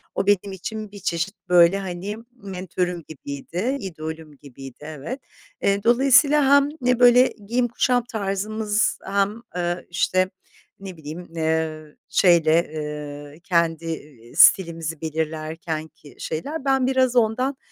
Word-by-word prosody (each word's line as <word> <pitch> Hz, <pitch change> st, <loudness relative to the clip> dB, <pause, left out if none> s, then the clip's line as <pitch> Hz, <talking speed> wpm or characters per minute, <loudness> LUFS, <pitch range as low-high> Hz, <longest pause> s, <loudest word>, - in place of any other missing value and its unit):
o 195 Hz, -, -1 dB
benim 205 Hz, -1 st, +2 dB
için 215 Hz, +3 st, -6 dB
bir 205 Hz, -, -10 dB
çeşit, 170 Hz, +3 st, -2 dB
böyle, 175 Hz, +2 st, +6 dB
hani, 190 Hz, +2 st, -5 dB
mentörüm 180 Hz, -5 st, -4 dB
gibiydi, 160 Hz, -, -4 dB
idolüm 160 Hz, -, -7 dB
gibiydi, 135 Hz, -2 st, -11 dB
evet. 155 Hz, -, -6 dB, 0.4 s
Eee, 200 Hz, 0 st, +1 dB
dolayısıyla 275 Hz, +4 st, +5 dB
hem 285 Hz, 0 st, +4 dB
ne, 250 Hz, 0 st, +2 dB
böyle, 245 Hz, +1 st, +7 dB, 0.2 s
giyim 240 Hz, +2 st, +1 dB
kuşam 245 Hz, +1 st, +1 dB
tarzımız 210 Hz, 0 st, -1 dB
hem, 200 Hz, +3 st, 0 dB
eee, 175 Hz, 0 st, -2 dB
işte, 185 Hz, +1 st, +1 dB, 0.5 s
ne 190 Hz, -3 st, -9 dB
bileyim, 160 Hz, +3 st, -8 dB
ııı, 160 Hz, -1 st, -2 dB
şeyle, 170 Hz, -3 st, +4 dB
ııı, 150 Hz, -1 st, -6 dB
kendi, 165 Hz, -2 st, +1 dB
ııı, 145 Hz, -7 st, -8 dB
stilimizi 165 Hz, -4 st, +4 dB
belirlerkenki 160 Hz, -1 st, -5 dB
şeyler 280 Hz, -, -4 dB
ben 265 Hz, -2 st, +2 dB
biraz 260 Hz, -1 st, +2 dB
ondan 250 Hz, +4 st, +1 dB
180 Hz, 120 wpm, -23 LUFS, 160-220 Hz, 0.5 s, böyle